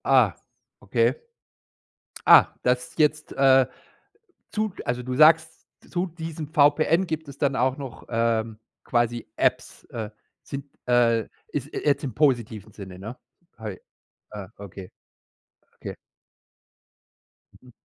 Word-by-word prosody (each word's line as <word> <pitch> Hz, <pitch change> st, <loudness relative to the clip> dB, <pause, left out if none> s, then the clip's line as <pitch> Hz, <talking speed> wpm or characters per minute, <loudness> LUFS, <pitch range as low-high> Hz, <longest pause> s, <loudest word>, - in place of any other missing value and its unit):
Ah, -, -, +4 dB, 0.4 s
okay. -, -, +1 dB, 1.1 s
Ah, -, -, +9 dB, 0.2 s
das 125 Hz, 0 st, 0 dB
jetzt, 150 Hz, -1 st, +1 dB
äh, 135 Hz, -1 st, +5 dB, 0.8 s
zu 215 Hz, -2 st, -1 dB
also, 125 Hz, 0 st, -2 dB
du 130 Hz, 0 st, -3 dB
sagst, 160 Hz, +2 st, +4 dB, 0.2 s
zu 180 Hz, +1 st, -1 dB
diesem 165 Hz, -2 st, -7 dB
VPN 155 Hz, +4 st, +3 dB
gibt 160 Hz, -1 st, -4 dB
es 140 Hz, -1 st, -10 dB
dann 140 Hz, -2 st, +1 dB
auch 130 Hz, +2 st, +1 dB
noch, 135 Hz, -5 st, -8 dB
ähm, 115 Hz, -1 st, 0 dB, 0.3 s
quasi 120 Hz, -1 st, 0 dB
Apps, -, -, 0 dB
äh, 110 Hz, -2 st, -6 dB, 0.3 s
sind, 140 Hz, -1 st, -6 dB, 0.2 s
äh 120 Hz, -2 st, +3 dB, 0.2 s
ist 145 Hz, 0 st, -4 dB
jetzt 145 Hz, 0 st, 0 dB
im 130 Hz, -5 st, -3 dB
positiven 115 Hz, -7 st, 0 dB
Sinne, 95 Hz, -3 st, -10 dB
ne? 110 Hz, +6 st, -8 dB, 0.4 s
Hei 105 Hz, -5 st, -7 dB, 0.5 s
Ah, 105 Hz, -3 st, -7 dB
okay 95 Hz, -2 st, -10 dB, 0.8 s
okay. -, -, -7 dB, 1.7 s
Mhm. 125 Hz, -, -17 dB
130 Hz, 120 wpm, -25 LUFS, 115-150 Hz, 1.7 s, Ah